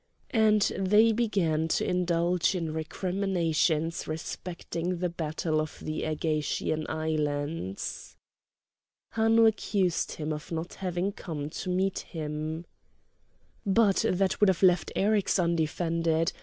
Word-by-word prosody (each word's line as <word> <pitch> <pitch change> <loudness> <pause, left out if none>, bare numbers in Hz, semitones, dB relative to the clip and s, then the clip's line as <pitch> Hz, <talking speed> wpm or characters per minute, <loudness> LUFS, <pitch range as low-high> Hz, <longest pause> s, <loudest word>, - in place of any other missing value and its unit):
And 215 -4 +4 0.2
they 210 +4 +5
began 190 -9 +1
to - - 0
indulge 175 0 +1
in 165 -3 -2
recriminations 165 -1 0
respecting 170 +2 -4
the 180 +1 -1
battle 160 -1 -1
of 155 - -6
the 155 0 -4
Ægatian 155 0 -1
islands. 150 - -3 1.0
Hanno 225 0 +4
accused 200 -5 +1
him 155 0 -3
of 150 +2 -8
not 165 +1 -4
having 185 +1 -2
come 155 -6 -6
to 185 - -5
meet 190 +1 0
him. 155 +1 -5 1.0
"But 200 0 +3
that 190 +1 +1
would 210 - +5
have 190 0 0
left 180 -3 +4
Eryx 205 0 +2
undefended. 165 -1 +1
170 Hz, 115 wpm, -28 LUFS, 155-190 Hz, 1.0 s, they